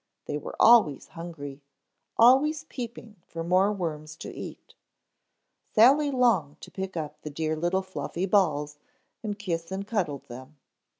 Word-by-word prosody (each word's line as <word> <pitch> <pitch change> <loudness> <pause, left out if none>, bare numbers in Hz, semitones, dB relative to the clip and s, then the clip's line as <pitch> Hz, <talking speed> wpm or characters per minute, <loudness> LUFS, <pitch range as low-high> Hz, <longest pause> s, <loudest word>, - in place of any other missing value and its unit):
They 145 - -3
were - - -8
always 215 - +5
hungry, 145 -5 -8 0.6
always 280 +6 +5
peeping 235 -6 -8
for 165 0 -5
more 185 +4 +3
worms 155 -6 -4
to - - -8
eat. - - -9 1.0
Sally 275 +7 +6
longed 225 - +2
to - - -11
pick 190 -2 -5
up 150 -1 -5
the 150 - -6
dear 155 +1 -2
little 175 +4 0
fluffy 175 0 -4
balls 150 -7 +1 0.4
and 210 -2 -4
kiss 170 -4 -4
and 195 +1 -3
cuddle 190 -10 -1
them. 130 +4 -11
175 Hz, 140 wpm, -27 LUFS, 150-215 Hz, 1.0 s, Sally